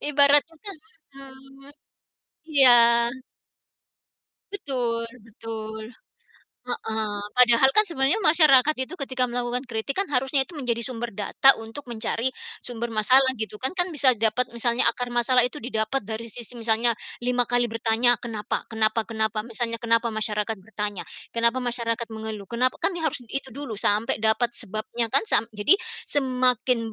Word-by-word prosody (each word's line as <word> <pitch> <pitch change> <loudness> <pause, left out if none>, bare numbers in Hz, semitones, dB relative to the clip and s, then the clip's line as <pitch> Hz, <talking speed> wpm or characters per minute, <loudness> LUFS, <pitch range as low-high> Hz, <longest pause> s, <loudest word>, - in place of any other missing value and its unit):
Ibaratnya 295 +6 +3 0.4
mhm, 270 0 -13 0.8
iya. 270 -3 +7 1.8
Betul 245 -10 -3 0.2
betul, 220 0 -8 0.8
heeh, 220 -3 -3 0.2
padahal 250 +1 +5
kan 425 - +7
sebenarnya 275 +4 0
masyarakat 305 -3 +5
itu 360 - -10
ketika 260 -2 -1
melakukan 245 +1 -3
kritik 235 +2 -4
kan, 390 +1 +1
harusnya 265 +1 +2
itu - - -16
menjadi 245 -5 -2
sumber 240 -1 -3
data 210 +7 +3
untuk 225 +6 -9
mencari 230 +1 -2 0.3
sumber 235 -1 -4
masalah, 255 +5 +4
gitu 220 -1 -5
kan. 265 - -1
Kan 355 0 +1
bisa 275 -3 +4
dapat 225 +3 +1
misalnya 235 +1 0
akar 245 0 -2
masalah 240 +1 +3
itu 250 - -3
didapat 220 0 -2
dari 225 +1 -5
sisi 240 0 -8
misalnya 230 +1 +1 0.3
5 250 0 +1
kali 245 0 +2
bertanya, 230 +2 +2
kenapa 220 -3 -4
kenapa 220 0 0
kenapa, 220 -1 -1
misalnya 230 0 -3
kenapa 230 0 +1
masyarakat 215 0 -1
bertanya, 205 -1 -5 0.3
kenapa 235 +2 +2
masyarakat 235 -1 -1
mengeluh, 220 -3 -7
kenapa? 250 +2 0
Kan - - 0
nih 325 - -4
harus 290 - -1
itu 275 +3 -4
dulu, 265 -4 -7
sampai 210 +2 +1
dapat 220 +2 +1
sebabnya 220 +3 -3
kan, - - +5
sam 215 - +3
jadi 210 - +3 0.3
semakin 250 -4 +1
240 Hz, 140 wpm, -24 LUFS, 220-265 Hz, 1.8 s, iya